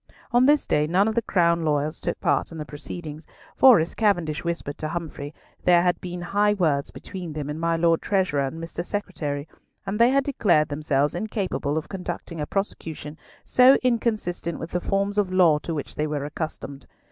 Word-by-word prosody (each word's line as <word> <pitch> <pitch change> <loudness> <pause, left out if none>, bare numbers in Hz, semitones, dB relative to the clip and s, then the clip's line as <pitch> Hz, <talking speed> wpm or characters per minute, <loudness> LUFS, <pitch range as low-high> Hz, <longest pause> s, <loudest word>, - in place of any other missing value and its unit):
On 245 +2 +5
this 295 0 +4
day 150 0 +1
none 190 +6 +3
of 220 - 0
the 235 - +1
Crown 170 -5 +2
lawyers 150 0 0
took - - -3
part - - 0
in 165 - -8
the 155 - -5
proceedings; 155 +1 -8 0.3
for, 255 -7 +7
as 160 +2 -2
Cavendish 175 -8 0
whispered 170 -4 -4
to 155 - -2
Humfrey, 155 -3 -5 0.3
there 175 -1 +5
had 180 -1 +1
been 175 -1 -6
high 205 +4 +2
words 155 -7 +1
between 180 -5 -8
them 150 -1 -4
and 150 - -5
my 165 0 +1
Lord 165 0 +2
Treasurer 185 -8 +1
and 160 +5 -7
Mr. 165 +1 -5
Secretary; 160 -8 -4 0.4
and 200 +3 -3
they 235 +1 +6
had 275 +1 +3
declared 180 - +2
themselves 145 -1 0
incapable 185 -6 -2
of 160 - -3
conducting 180 -3 -6
a 150 - -3
prosecution 160 -6 -4 0.3
so 255 +2 +6
inconsistent 215 -9 -1
with 165 - -7
the 180 - -1
forms 200 +2 0
of 195 -3 0
law 175 -5 +4
to 165 +1 -4
which 145 - -5
they 150 - -1
were 145 -2 -3
accustomed. 145 -2 -6
170 Hz, 195 wpm, -24 LUFS, 150-195 Hz, 0.4 s, for